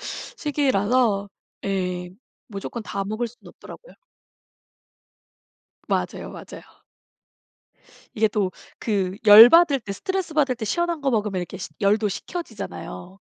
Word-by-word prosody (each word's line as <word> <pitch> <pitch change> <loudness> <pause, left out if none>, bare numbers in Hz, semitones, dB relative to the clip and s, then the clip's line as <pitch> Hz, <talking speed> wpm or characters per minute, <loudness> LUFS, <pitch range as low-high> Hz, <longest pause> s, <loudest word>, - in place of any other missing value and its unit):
시기라서 250 - 0 0.4
예 180 -2 -2 0.4
무조건 215 +2 -6
다 200 -1 -4
먹을 215 +4 -2
수는 235 +2 -15
없더라고요. - - -14 1.9
맞아요 - - -2
맞아요. - - -10 1.5
이게 220 0 +2
또 200 -2 -1 0.3
그 195 -4 -1
열 215 +3 +11
받을 330 -4 +5
때 205 -3 -6
스트레스 375 - -3
받을 275 -4 +2
때 230 - -6
시원한 340 +8 -1
거 275 -1 0
먹으면 210 -5 -1
이렇게 175 +2 -7
시 185 - -6
열도 210 +2 +2
식혀지잖아요. 200 - -7
215 Hz, 260 characters per minute, -23 LUFS, 195-275 Hz, 1.9 s, 열